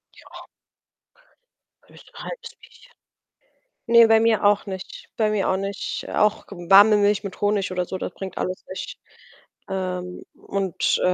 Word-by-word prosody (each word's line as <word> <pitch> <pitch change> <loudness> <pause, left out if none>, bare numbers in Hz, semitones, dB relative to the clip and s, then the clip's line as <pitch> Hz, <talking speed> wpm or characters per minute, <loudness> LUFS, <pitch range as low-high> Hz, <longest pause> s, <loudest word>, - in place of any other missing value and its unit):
Ja. - - -14 1.4
Höchstens - - -19
'n - - -8
1/2 - - -8
Bierchen. - - -19 0.9
Ne, 235 0 +7
bei 225 0 +5
mir 225 -1 +2
auch 205 0 +3
nicht. 190 -2 -8
Bei 215 -2 +2
mir 210 -2 0
auch 190 - +1
nicht. 195 +1 -4
Auch 210 0 +1
warme 200 +3 +5
Milch 205 0 +2
mit 195 - -7
Honig, 205 -2 0
oder 180 -1 -1
so, 185 - -5
das 180 - -5
bringt 190 -2 -8
alles 185 0 -3
nicht. 185 - -7 0.7
Ähm. 180 -1 -4
Und, 195 -3 -1
äh, 180 - +3
200 Hz, 150 wpm, -23 LUFS, 185-210 Hz, 1.4 s, Ne